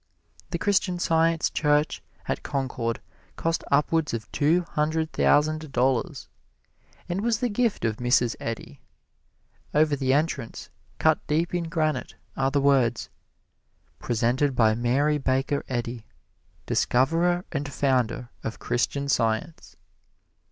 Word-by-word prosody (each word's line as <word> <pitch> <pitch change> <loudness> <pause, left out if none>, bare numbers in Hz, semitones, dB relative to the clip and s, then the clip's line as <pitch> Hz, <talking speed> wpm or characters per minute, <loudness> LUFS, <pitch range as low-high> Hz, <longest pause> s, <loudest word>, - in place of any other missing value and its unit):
The 170 - -2
Christian 190 0 +1
Science 165 -1 +2
Church 150 0 +1 0.3
at - - -2
Concord 125 -4 -2 0.3
cost 165 0 -1
upwards 150 0 +2
of 115 0 -7
two 165 +5 +2
hundred 155 +1 0
thousand 155 0 +2
dollars, 125 0 0 0.8
and 180 +2 -2
was 230 0 +1
the 245 -1 0
gift 230 - 0
of 110 -1 0
Mrs. 120 -1 +2
Eddy. 115 -1 -6 0.9
Over 150 -1 +4
the 130 -2 0
entrance, 145 -5 -1 0.3
cut 155 -1 +3
deep 160 +4 0
in 175 -1 -1
granite, 155 -2 -1 0.2
are 135 0 +1
the 140 +1 +1
words, 130 -5 +2 0.9
"Presented 125 +4 +1
by 110 -2 +4
Mary 135 +6 +1
Baker 135 +1 0
Eddy, 120 -2 -4 0.6
Discoverer 170 +8 +2
and 145 -2 -3
Founder 125 -3 0
of 115 - -4
Christian 140 +3 -1
Science." 115 +4 -1
145 Hz, 120 wpm, -26 LUFS, 125-160 Hz, 0.9 s, Over